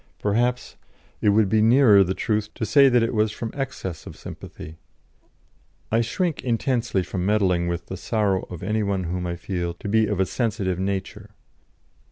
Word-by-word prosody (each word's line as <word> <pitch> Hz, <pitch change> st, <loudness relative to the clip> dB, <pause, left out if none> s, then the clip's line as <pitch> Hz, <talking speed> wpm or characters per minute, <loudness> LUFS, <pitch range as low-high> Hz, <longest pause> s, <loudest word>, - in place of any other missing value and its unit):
Perhaps 120 Hz, +4 st, -1 dB, 0.4 s
it 105 Hz, -, +3 dB
would 105 Hz, 0 st, +4 dB
be 110 Hz, +3 st, +2 dB
nearer 110 Hz, -3 st, +6 dB
the 95 Hz, +1 st, -2 dB
truth 105 Hz, -1 st, -1 dB
to 110 Hz, -, -2 dB
say 140 Hz, +3 st, +6 dB
that 120 Hz, -2 st, +3 dB
it 115 Hz, -, -1 dB
was 110 Hz, -1 st, +2 dB
from 110 Hz, +1 st, -5 dB
excess 135 Hz, -, -5 dB
of -, -, -10 dB
sympathy. 80 Hz, +1 st, -10 dB, 1.1 s
I 115 Hz, +1 st, +3 dB
shrink 160 Hz, +8 st, -2 dB
intensely 120 Hz, -4 st, 0 dB
from 90 Hz, 0 st, -4 dB
meddling 95 Hz, -4 st, +2 dB
with 85 Hz, 0 st, -3 dB
the 95 Hz, -, -6 dB
sorrow 100 Hz, -1 st, 0 dB
of 90 Hz, -3 st, -8 dB
any 110 Hz, 0 st, 0 dB
one 100 Hz, -2 st, -1 dB
whom 90 Hz, +1 st, -3 dB
I 85 Hz, -, -3 dB
feel 85 Hz, -1 st, -4 dB
to 95 Hz, -, -8 dB
be 110 Hz, +1 st, +3 dB
of 105 Hz, -3 st, -2 dB
a 95 Hz, -, +3 dB
sensitive 100 Hz, -3 st, -2 dB
nature. 100 Hz, +2 st, -4 dB
105 Hz, 180 wpm, -24 LUFS, 95-115 Hz, 1.1 s, nearer